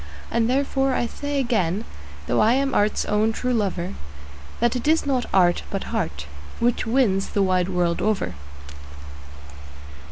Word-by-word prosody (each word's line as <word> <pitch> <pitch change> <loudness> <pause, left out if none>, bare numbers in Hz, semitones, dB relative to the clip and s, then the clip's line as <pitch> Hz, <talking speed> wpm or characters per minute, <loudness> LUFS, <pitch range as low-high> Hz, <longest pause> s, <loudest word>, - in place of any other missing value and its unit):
And 230 0 +1
therefore 270 0 +1
I - - +1
say 285 +4 -4
again, 215 -5 0 0.4
though 120 - +1
I 225 +2 +5
am 270 +1 +1
art's 210 +1 +1
own 215 +1 +2
true 250 +3 -2
lover, 190 -5 -1 0.7
That 240 +1 +2
it 250 +3 -3
is 320 0 +3
not 260 -3 0
art, 175 -2 +3
but 195 - -3
heart, 170 - -2 0.3
which 235 -1 +1
wins 225 -6 +2
the 200 - +1
wide 185 -1 +1
world 175 -2 0
over. 205 - 0
220 Hz, 150 wpm, -23 LUFS, 190-250 Hz, 0.7 s, I